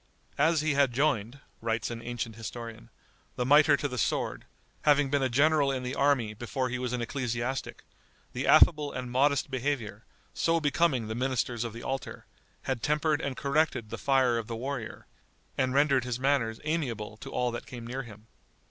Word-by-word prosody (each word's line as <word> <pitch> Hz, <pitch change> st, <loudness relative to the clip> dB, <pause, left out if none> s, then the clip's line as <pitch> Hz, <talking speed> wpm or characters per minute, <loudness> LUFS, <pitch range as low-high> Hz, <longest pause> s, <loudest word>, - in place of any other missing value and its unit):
"As 160 Hz, +1 st, +4 dB
he 155 Hz, -1 st, +1 dB
had 140 Hz, -3 st, +3 dB
joined," 135 Hz, -2 st, 0 dB, 0.2 s
writes 115 Hz, 0 st, -1 dB
an 115 Hz, 0 st, -6 dB
ancient 115 Hz, -1 st, -4 dB
historian, 115 Hz, 0 st, -8 dB, 0.5 s
"the 125 Hz, -, -1 dB
miter 145 Hz, +1 st, +6 dB
to 145 Hz, -, -1 dB
the 125 Hz, -3 st, -4 dB
sword, -, -, -1 dB, 0.4 s
having 145 Hz, -2 st, +3 dB
been 145 Hz, -1 st, +2 dB
a 130 Hz, -, +1 dB
general 140 Hz, +2 st, +3 dB
in 130 Hz, -1 st, -3 dB
the 125 Hz, +1 st, -3 dB
army 135 Hz, -7 st, +2 dB
before 125 Hz, +3 st, -3 dB
he 125 Hz, +1 st, -3 dB
was 125 Hz, -1 st, -2 dB
an 125 Hz, -1 st, -1 dB
ecclesiastic, 125 Hz, +1 st, -3 dB, 0.5 s
the -, -, -2 dB
affable 150 Hz, -3 st, +6 dB
and 125 Hz, -1 st, -5 dB
modest 140 Hz, +2 st, +2 dB
behaviour, 125 Hz, -5 st, -2 dB, 0.3 s
so 165 Hz, 0 st, +2 dB
becoming 145 Hz, -5 st, +1 dB
the 110 Hz, -, -3 dB
ministers 125 Hz, -1 st, -1 dB
of 120 Hz, -, -4 dB
the 115 Hz, +2 st, -9 dB
altar, 135 Hz, 0 st, -5 dB, 0.4 s
had 130 Hz, -3 st, -2 dB
tempered 150 Hz, +2 st, +1 dB
and 135 Hz, -2 st, -3 dB
corrected 140 Hz, -6 st, 0 dB
the -, -, -4 dB
fire 130 Hz, -4 st, +3 dB
of 110 Hz, -, -6 dB
the 115 Hz, -, -4 dB
warrior, 130 Hz, 0 st, -5 dB, 0.5 s
and 130 Hz, 0 st, 0 dB
rendered 140 Hz, -3 st, +4 dB
his 125 Hz, 0 st, -3 dB
manners 130 Hz, -5 st, +1 dB
amiable 125 Hz, -9 st, -2 dB
to -, -, -9 dB
all 125 Hz, -1 st, 0 dB
that 120 Hz, -, -6 dB
came 120 Hz, -2 st, -8 dB
near 125 Hz, +3 st, -4 dB
him." 110 Hz, -3 st, -12 dB
130 Hz, 185 wpm, -29 LUFS, 115-140 Hz, 0.5 s, miter